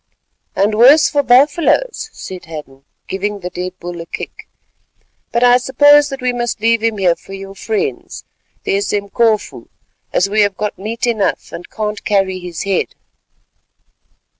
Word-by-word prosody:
"And 205 +2 +2
worse 270 +7 +6
for 290 - +2
buffaloes," 300 - +2
said 185 - -9
Hadden, 145 -4 -10 0.2
giving 200 +1 -3
the 180 0 -5
dead 180 +1 -5
bull 175 -1 -6
a 165 - -10
kick, - - -8 0.8
"but 235 - +1
I 245 0 +6
suppose 290 +3 +5
that 270 -1 -6
we 250 0 0
must 240 -1 -2
leave 230 +1 +2
him 225 -1 0
here 180 -3 +2
for 195 - -13
your 195 0 -8
friends, 425 - -3 0.4
the - - 0
Esemkofu, 205 +2 0 0.4
as 180 - +2
we 210 +2 +2
have 205 -2 +1
got 210 -2 -3
meat 225 +5 -3
enough, 220 -5 -1
and 175 - -9
can't 210 -1 -4
carry 195 -2 +1
his 175 -2 -6
head." 195 -1 -1
210 Hz, 155 wpm, -16 LUFS, 190-245 Hz, 0.8 s, worse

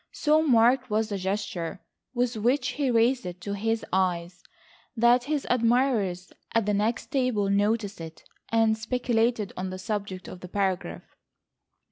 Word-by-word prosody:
So 305 0 +3
marked 250 -3 +3
was 215 +1 0
the 200 - -2
gesture 190 -2 -3 0.4
with 245 0 0
which 250 +5 +1
he 275 +1 -1
raised 240 +2 +3
it 180 0 -7
to 200 - -4
his 225 +2 -1
eyes 180 -1 0 0.6
that 240 +2 +4
his 295 0 -1
admirers 230 -7 +1 0.2
at 230 -2 +3
the 210 - +1
next 215 +4 -1
table 245 -7 +1
noticed 205 -1 0
it, 160 0 -9 0.3
and 225 -1 +3
speculated 225 -2 0
on 185 +1 -4
the 185 - -6
subject 200 -2 -4
of 180 - -9
the 180 - -9
paragraph. 185 - -2
220 Hz, 150 wpm, -26 LUFS, 190-245 Hz, 0.6 s, that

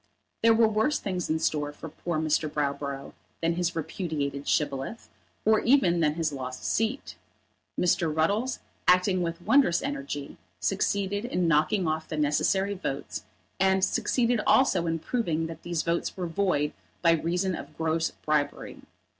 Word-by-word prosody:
There 225 0 +6
were 225 0 +5
worse 220 +7 +1
things 185 -3 -3
in 160 - +2
store 150 -2 0
for 145 - -9
poor 160 +2 -4
Mr. 155 0 +1
Browborough 140 -1 -3 0.3
than 165 0 +1
his 175 +1 -1
repudiated 155 -4 -3
Shibboleth, 145 +8 -1 0.4
or 220 0 +5
even 195 -10 +3
than 150 -2 +2
his 160 -3 -1
lost 130 -2 -6
seat. 225 +5 -1 0.6
Mr. 175 -2 +2
Ruddles, 200 +12 +1 0.3
acting 180 +1 +4
with 170 0 -3
wondrous 265 -12 +4
energy, 275 - -4 0.2
succeeded 200 +2 0
in 180 -7 0
knocking 165 +4 +2
off 155 0 -1
the 155 - -4
necessary 190 +7 +2
votes, 145 -8 -5 0.3
and 190 0 +4
succeeded 235 0 +1
also 255 -10 +4
in 165 0 0
proving 165 -4 -1
that 165 0 -7
these 170 -2 -2
votes 170 +3 -1
were 180 - -2
void 165 -4 0 0.3
by 170 - +6
reason 175 +3 0
of - - -8
gross 160 0 0
bribery. 150 -1 -2
170 Hz, 150 wpm, -27 LUFS, 155-200 Hz, 0.6 s, There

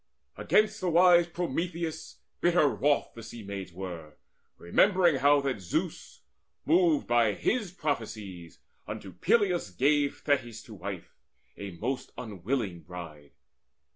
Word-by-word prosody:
Against 215 0 +2
the 185 - 0
wise 175 0 +6
Prometheus 170 -1 -4 0.2
bitter 175 -3 +4
wroth 145 +1 +1
The 115 - -10
Sea 115 0 -9
maids 100 -2 -6
were, 85 -4 -8 0.4
remembering 175 - +3
how 145 +2 +4
that 135 -5 -2
Zeus, 85 - -4 0.4
Moved 165 -1 +3
by 115 -4 +3
his 215 - -1
prophecies, 105 - -5 0.3
unto 95 - -7
Peleus 180 - +1
gave 140 +8 +1
Thetis 125 -6 -1
to 110 - -12
wife, 95 -2 -8 0.4
a 100 - -7
most 125 +7 -4
unwilling 105 -3 -3
bride. 85 -5 -10
130 Hz, 120 wpm, -29 LUFS, -, 0.4 s, wise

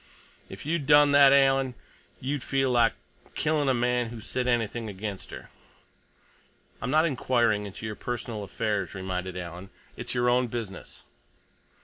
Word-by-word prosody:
If - - -10
you'd 155 -3 -1
done 145 -1 +6
that, 140 -1 +7
Alan, 135 -2 +3 0.4
you'd 140 +1 -3
feel 135 0 0
like 120 -2 +4 0.4
killing 150 -2 +1
a - - +4
man 120 0 0
who 115 0 -8
said 125 +3 -3
anything 115 -2 -1
against 100 0 -6
her." - - -10 1.3
"I'm - - -3
not 155 +4 +4
inquiring 120 -8 +1
into 100 +3 -8
your 110 -1 -4
personal 120 -2 -5
affairs," 100 -1 -2
reminded 95 -1 -4
Alan. 90 +2 -7 0.3
"It's - - -6
your 120 0 +1
own 125 +1 +3
business." 110 -4 -7
120 Hz, 145 wpm, -27 LUFS, 105-135 Hz, 1.3 s, that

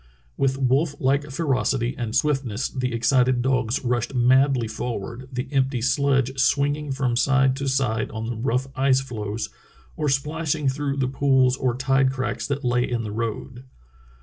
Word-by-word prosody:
With 135 -1 0
wolf 135 +3 +1
like 140 +3 +1
ferocity 135 -4 0
and 115 -2 -4
swiftness 135 -4 0
the 125 -1 -2
excited 125 +1 +2
dogs 130 -1 0
rushed 120 +1 -1
madly 130 0 +3
forward, 120 +2 -5
the 125 +1 -4
empty 135 -2 +1
sledge 135 0 +1
swing 140 +1 +2
ing 150 -1 -6
from 130 -3 0
side 135 +1 +3
to 140 0 -3
side 125 -5 0
on 110 0 -5
the 120 +1 -3
rough 125 +3 -1
ice 135 -1 +3
floes 110 -4 -5 0.5
or 150 - -1
splashing 150 +2 -1
through 140 +1 -1
the 130 -2 +1
pools 130 -1 +3
or 130 -3 -1
tide 135 0 +2
cracks 130 -1 -3
that 140 0 -3
lay 125 0 +2
in 120 -2 -1
the 105 - -5
road. 115 +3 -5
130 Hz, 165 wpm, -23 LUFS, 120-135 Hz, 0.5 s, madly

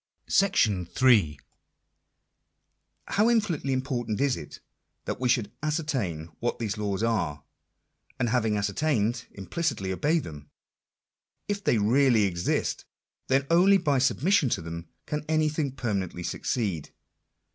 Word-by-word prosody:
§8. 105 - +3 1.7
How 215 +3 +2
infinitely 190 -12 +1
important 125 -5 -2
is 140 -2 +2
it, - - -9 0.5
that - - -3
we 125 -1 0
should 115 -4 +1
ascertain 135 - -2
what 120 - -1
these 110 -3 -2
laws 105 0 -2
are; 85 -11 -1 0.8
and 120 - +1
having 110 -3 +1
ascertained, 115 +2 0
implicitly 100 - -2
obey 150 - +1
them! 75 - -7 1.0
If 205 0 -2
they 120 - +3
really 115 +1 +4
exist, 90 -3 -1 0.4
then 135 +1 +2
only 190 +4 +6
by 145 -7 +1
submission 145 +4 +2
to - - -1
them 85 0 -7 0.2
can 150 0 -3
anything 155 -2 +1
permanently 100 -8 -3
succeed. 90 - -2
120 Hz, 115 wpm, -27 LUFS, 100-150 Hz, 1.7 s, only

